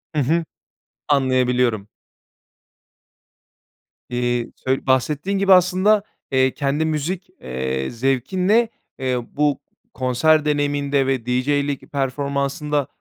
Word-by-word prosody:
Hı 150 - +2
hı, 165 +5 +1 0.6
anlayabiliyorum. 125 -6 +2 2.2
Eee, 120 -1 -1 0.2
sö 130 +1 0
bahsettiğin 150 +9 +1
gibi 195 0 +5
aslında, 185 +3 +4 0.3
eee, 130 0 +3
kendi 145 +2 0
müzik, 160 +4 -2
eee, 65 +1 -3
zevkinle, 180 - +1 0.3
eee, 130 -1 0
bu 145 -1 +1 0.3
konser 150 +5 +2
deneyiminde 145 -2 +1
ve 130 -4 -1
DJ'lik 140 +3 -1
performansında 140 +1 -1
140 Hz, 90 wpm, -21 LUFS, 125-155 Hz, 2.2 s, gibi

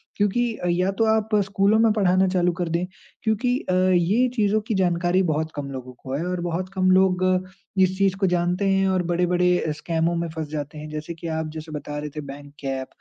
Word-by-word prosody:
क्योंकि 225 +3 +1
अ, 180 - -4
या 180 +3 +1
तो 225 +3 +1
आप 220 0 0
स्कूलों 200 +3 +2
में 225 -1 +5
पढ़ाना 190 -2 +3
चालू 180 -1 +2
कर 175 -2 -1
दें, 170 +2 0 0.4
क्योंकि 235 +3 +1
अ, 185 - +2 0.2
ये 200 +9 +3
चीज़ों 215 -1 +2
की 220 - 0
जानकारी 180 0 +2
बहुत 155 -1 -1
कम 145 -1 -4
लोगों 130 -1 -7
को 130 +2 -8
है 155 - -2
और 180 -1 -2
बहुत 175 +2 -3
कम 185 -1 +2
लोग 185 -1 +3 0.6
इस 185 0 +3
चीज़ 195 -1 +2
को 195 - +2
जानते 180 +2 0
हैं 195 0 +3
और 185 -1 +1
बड़े-बड़े 180 -2 +2
स्कैमों 165 +1 0
में 170 0 -1
फँस 160 -2 -3
जाते 150 0 -5
हैं। 150 0 -7
जैसे 155 +2 -5
कि 165 0 -8
आप 160 -1 -2
जैसे 155 0 -8
बता 150 0 -5
रहे 150 0 -4
थे 150 - -3
बैंक 145 +1 -13
ऐप, 135 -1 -2
180 Hz, 215 wpm, -23 LUFS, 160-195 Hz, 0.6 s, में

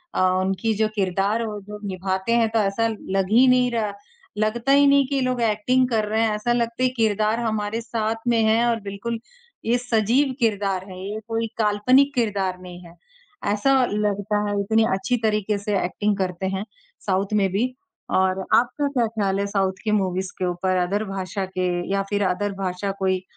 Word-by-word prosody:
अ - - +1 0.2
,उनकी 195 +4 0
जो 220 +1 +2
किरदार 200 +3 0
वो 210 -1 -5
जो 210 0 -7
निभाते 190 +2 -2
हैं 225 -1 +3
तो 225 - +3
ऐसा 210 +2 +1
लग 195 -3 -2
ही 245 +4 +6
नहीं 250 0 +4
रहा, 220 -3 -1 0.4
लगता 230 +5 0
ही 285 +1 +6
नहीं 280 0 +5
कि 280 - -2
ये 270 - +1
लोग 255 -1 0
एक्टिंग 235 +4 +2
कर 220 -3 +1
रहे 220 +1 0
हैं 225 - +3
ऐसा 240 +3 0
लगता 235 +1 -1
है 255 - +4
कि - - -12
किरदार 215 0 +1
हमारे 220 -1 -2
साथ 225 -1 -2
में 235 -1 +3
है 220 +2 +3
और 230 -1 0
बिल्कुल 205 +4 -4 0.5
ये 235 +2 +3
सजीव 245 +3 +1
किरदार 200 -5 0
हैं, 185 - -9
ये 200 +3 -5
कोई 225 0 -1
काल्पनिक 230 +6 +3
किरदार 195 -6 0
नहीं 180 0 -10
है। 170 - -13 0.6
ऐसा 265 +5 +3
लगता 205 0 0
है 205 0 -1
इतनी 220 +2 +2
अच्छी 195 +6 0
तरीके 210 -1 +1
से 205 0 -1
एक्टिंग 205 +3 -1
करते 185 -1 -2
हैं 195 - -4 0.4
साउथ 195 +1 0
में 200 -2 +3
भी 240 +7 0 0.5
और 190 0 +1
आपका 270 +4 +2
क्या 250 -5 +1
ख़्याल 200 -3 -1
है 200 - 0
साउथ 195 -2 0
की 215 - 0
मूवीज़ 190 -2 0
के 185 - 0
ऊपर, 180 +1 -1
अदर 190 +4 0
भाषा 195 0 -4
के 185 -1 -2 0.2
या 195 0 +1
फिर 205 0 0
अदर 200 +2 -1
भाषा 185 +2 -2
कोई 190 -1 0
210 Hz, 195 wpm, -23 LUFS, 195-230 Hz, 0.6 s, ही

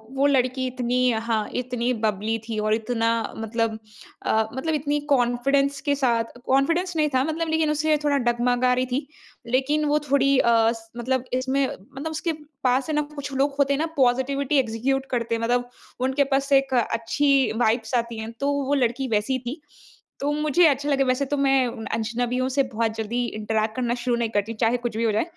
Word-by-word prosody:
वो 275 +1 +2
लड़की 260 -1 +1
इतनी 250 0 +1 0.2
हाँ 220 -2 0
इतनी 250 0 -1
बबली 215 +2 0
थी। 220 - -3
और 215 0 +1
इतना 230 +1 0 0.3
मतलब 225 0 -1 0.5
अ, 220 0 +2
मतलब 315 +5 -2
इतनी 295 0 0
कॉन्फिडेंस 275 +3 +1
के 285 -1 +1
साथ 235 -4 0
कॉन्फिडेंस 330 +7 +1
नहीं 300 -1 +2
था, 255 - +3
मतलब 320 +2 -2
लेकिन 315 -1 +1
उसे 305 0 +2
थोड़ा 285 -1 +3
डगमगा 245 +1 +2
रही 255 +1 +1
थी। 260 +3 -3 0.5
लेकिन 295 +3 +1
वो 295 +1 +2
थोड़ी 275 0 +4
अ, 235 - +3 0.2
स 225 -1 -9
मतलब 255 +1 -1
इसमें 265 +2 +1
मतलब 275 +11 -7
उसके 315 +1 -2 0.3
पास 260 +3 +2
है 310 - 0
ना 300 - +2
कुछ 285 -1 -5
लोग 275 +1 +1
होते 280 0 +3
हैं 275 - 0
ना, 320 - +1
पॉजिटिविटी 265 +3 +2
एक्जीक्यूट 265 +3 -1
करते 235 -2 0
हैं, 230 - -4
मतलब 245 +1 0 0.3
उनके 265 +2 +2
पास 275 +1 -1
एक 270 -1 +3
अच्छी 255 +4 +2
वाइब्स 225 +1 0
आती 235 -1 -1
हैं, 220 +1 -5
तो 280 +4 -1
वो 280 0 -1
लड़की 250 +3 -2
वैसी 255 +5 -1
थी। 290 +5 -5 0.6
तो 285 +1 0
मुझे 305 +3 +3
अच्छा 285 0 0
लगे 275 -1 +3
वैसे 255 +2 +1
तो 290 - +1
मैं 270 -2 +3 0.3
अजनबियों 245 +3 -1
से 275 +1 +2
बहुत 225 -1 0
जल्दी 220 +2 -3 0.2
इंटरैक्ट 215 0 -1
करना 240 -2 0
शुरू 245 0 -1
नहीं 235 -1 -1
करती, 210 +1 -1
चाहे 230 +2 +1
कुछ 240 -2 -4
भी 230 - 0
हो 225 - +2
जाए। 215 - +2
255 Hz, 190 wpm, -24 LUFS, 230-280 Hz, 0.6 s, थोड़ी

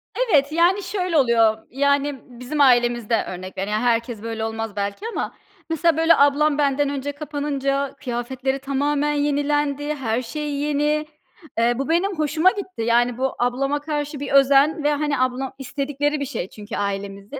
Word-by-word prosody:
Evet, 305 - +2
yani, 350 +5 +3
şöyle 365 -4 -1
oluyor. 230 -4 +4
Yani, 280 +1 +1
bizim 250 +4 -4
ailemizde 240 -3 +3
örnek 185 +1 -7
vere 195 +2 -2
yani 215 +2 0
herkes 235 -2 0
böyle 225 0 -4
olmaz 225 -1 -4
belki 200 - -3
ama. - - -3 0.4
Mesela, 325 0 +2
böyle, 325 +1 +5
ablam 285 +1 +3
benden 285 -1 +1
önce 285 0 -3
kapanınca 280 -2 -2
kıyafetleri 260 +1 -3
tamamen 285 +2 0
yenilendi, 290 0 0
her 240 -4 -1
şey 295 +5 -5
yeni. 295 +1 0 0.5
Eee, 235 +1 +3
bu 275 +3 -3
benim 350 +2 +1
hoşuma 310 +4 +3
gitti. 380 - -6
Yani 235 +1 +2
bu 265 0 -1
ablama 275 +4 0
karşı 295 -1 -3
bir 285 - -5
özen 275 +3 +4
ve, 295 0 +3
hani, 295 -2 -1
ablam 255 +1 -1
istedikleri 285 +2 -2
bir 280 - -2
şey 230 -9 -5
çünkü 210 +1 -8
ailemizin. 200 +4 -4
280 Hz, 160 wpm, -22 LUFS, 240-295 Hz, 0.5 s, böyle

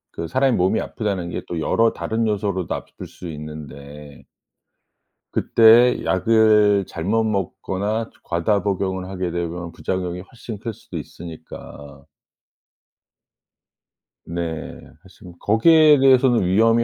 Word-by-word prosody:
그 85 - -4
사람의 130 +7 +2
몸이 95 +4 +2
아프다는 100 -5 -3
게 - - -4
또 85 - -4
여러 115 +8 +2
다른 115 +1 -2
요소로도 100 -4 -2
아플 - - -9
수 90 - -11
있는데 75 -1 -10 1.1
그때에 115 +2 +5
약을 105 0 +3
잘못 100 +7 -1
먹거나 105 +1 -2
저 - - -27
과다 90 +4 0
복용을 95 -2 -2
하게 90 -2 -3
되면 85 0 -4
부작용이 90 0 -4
훨씬 115 +1 -10
클 115 +1 -5
수도 - - -8
있으니까 75 -4 -11 2.2
네. 85 -2 -5 0.2
그래서 95 0 -18
뭐 90 - -11
거기에 150 - +5
대해서는 130 -5 +4
위험이 115 +5 +3
95 Hz, 265 characters per minute, -21 LUFS, 85-110 Hz, 2.2 s, 그때에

